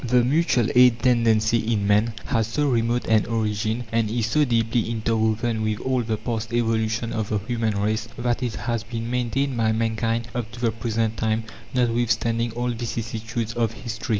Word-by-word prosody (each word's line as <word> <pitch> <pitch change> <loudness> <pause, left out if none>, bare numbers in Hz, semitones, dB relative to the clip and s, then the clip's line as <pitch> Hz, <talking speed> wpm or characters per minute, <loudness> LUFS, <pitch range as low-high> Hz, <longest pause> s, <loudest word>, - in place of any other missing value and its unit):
The 125 0 +3
mutual 130 -3 +2
aid 125 -2 +5
tendency 115 -2 +3
in 100 -2 0
man 105 +2 +2
has 110 -2 0
so 145 +6 0
remote 120 -1 +1
an 110 -2 +3
origin, 110 +1 -1
and 115 -2 +1
is 115 0 0
so 130 +7 +2
deeply 115 -1 +1
interwoven 110 0 0
with 110 -1 -1
all 130 -1 0
the 110 -2 -2
past 115 0 -4
evolution 115 -1 0
of 110 -2 -2
the 105 - +1
human 110 0 -1
race, 105 +1 0
that 120 +1 -1
it 120 -4 -2
has 120 0 -2
been 115 +1 -5
maintained 125 +2 0
by 110 -1 +2
mankind 115 +1 -1
up 120 -2 -4
to 120 - -9
the 120 -2 +1
present 115 0 -1
time, 110 0 0 0.3
notwithstanding 115 -1 +1
all 120 +1 -2
vicissitudes 115 -1 -4
of 115 -1 0
history. 110 +1 -7
115 Hz, 180 wpm, -24 LUFS, 110-120 Hz, 0.3 s, aid